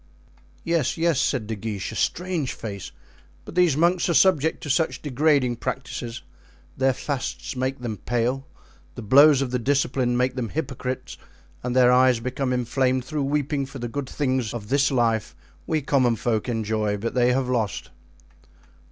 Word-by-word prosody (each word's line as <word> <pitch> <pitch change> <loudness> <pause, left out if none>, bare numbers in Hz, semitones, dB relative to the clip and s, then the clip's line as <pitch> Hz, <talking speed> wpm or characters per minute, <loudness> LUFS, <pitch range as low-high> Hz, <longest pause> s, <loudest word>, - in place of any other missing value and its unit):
"Yes, 165 -4 0
yes," 165 -4 +2
said 125 -6 0
De 110 +1 -4
Guiche, 100 -1 -4
"a - - -8
strange 175 -4 -1
face; 100 -4 -7 0.5
but - - -9
these 175 -5 +3
monks 175 +2 +2
are 170 - +2
subject 160 -1 +3
to 150 - -6
such 160 +3 +1
degrading 140 -3 +2
practices; 125 -2 -5 0.5
their 135 0 +2
fasts 135 +1 -4
make 130 +1 -1
them 115 -4 -4
pale, 120 +6 -1 0.5
the 120 - -7
blows 140 +5 +6
of 125 - -4
the 125 - 0
discipline 130 -1 +1
make 125 +1 +1
them 125 -3 -3
hypocrites, 130 -4 -4 0.4
and 125 0 -3
their 125 -1 +6
eyes 125 -1 +4
become 130 +2 -2
inflamed 125 +1 0
through 150 +3 -3
weeping 145 -1 -1
for 140 - -9
the 120 -2 -4
good 135 +2 -5
things 130 -5 -1
of 105 -3 -7
this 140 +1 +3
life 115 -4 0 0.3
we 155 -3 0
common 130 -4 +2
folk 110 +1 -1
enjoy, 110 -2 -1
but 115 +3 -3
they 125 0 +3
have 130 0 0
lost." 115 -5 -2
130 Hz, 165 wpm, -24 LUFS, 120-140 Hz, 0.5 s, blows